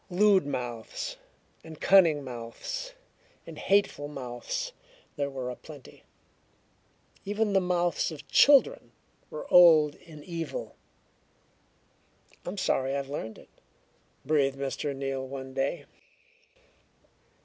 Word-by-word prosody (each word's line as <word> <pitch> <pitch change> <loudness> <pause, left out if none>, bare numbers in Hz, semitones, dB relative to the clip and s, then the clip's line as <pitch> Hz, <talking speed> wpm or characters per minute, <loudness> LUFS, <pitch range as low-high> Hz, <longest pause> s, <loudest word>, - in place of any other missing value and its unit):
Lewd 195 -2 +4
mouths, 120 -5 -5 0.5
and 160 -2 -11
cunning 165 -7 +5
mouths, 135 - -6 0.5
and 160 -2 -10
hateful 195 -7 +1
mouths 135 - -5 0.4
there 140 -1 -2
were 130 -2 -5
aplenty. 145 +2 -12 1.2
Even 205 +1 -1
the 195 - +4
mouths 175 -1 0
of 155 - -10
children 290 - +4 0.4
were - - -7
old 160 -4 +8
in 155 -3 -14
evil. 170 - -5 1.7
"I'm 185 +3 -4
sorry 135 -7 0
I've 140 -1 -3
learned 110 -6 -5
it," - - -17 0.8
breathed 140 -3 +2
Mr. 140 +1 -3
Neal 135 -1 -3
one 130 0 -7
day. 140 +3 -2
150 Hz, 105 wpm, -28 LUFS, 135-185 Hz, 1.7 s, old